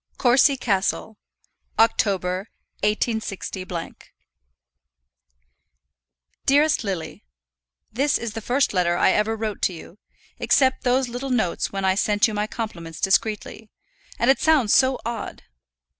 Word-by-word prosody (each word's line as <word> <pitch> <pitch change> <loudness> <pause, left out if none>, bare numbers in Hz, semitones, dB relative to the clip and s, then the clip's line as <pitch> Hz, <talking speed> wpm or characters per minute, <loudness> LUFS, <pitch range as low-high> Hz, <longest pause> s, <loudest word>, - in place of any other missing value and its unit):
Courcy 265 +2 +4
Castle, 205 -1 -1 0.6
October, 195 -3 +1 0.3
186. 215 -1 -2 3.0
DEAREST 295 +1 +3
LILY, 190 - -5 0.7
This 275 +5 +1
is 230 -2 -5
the 225 - -5
first 250 +3 +1
letter 175 -2 +1
I - - +4
ever 215 +1 +1
wrote 215 -2 -4
to 185 - +1
you, 170 +4 -12 0.4
except 260 -1 +2
those 255 +1 +2
little 245 +3 -5
notes 220 -9 0
when 195 -1 -3
I 190 - +3
sent 205 +3 +2
you 220 - -5
my 210 0 -1
compliments 170 -9 -6
discreetly, 210 +2 -1 0.5
and 240 +3 +4
it 270 - +1
sounds 295 -9 +3
so 260 0 +3
odd. 235 0 -5
220 Hz, 120 wpm, -23 LUFS, 195-250 Hz, 3.0 s, Courcy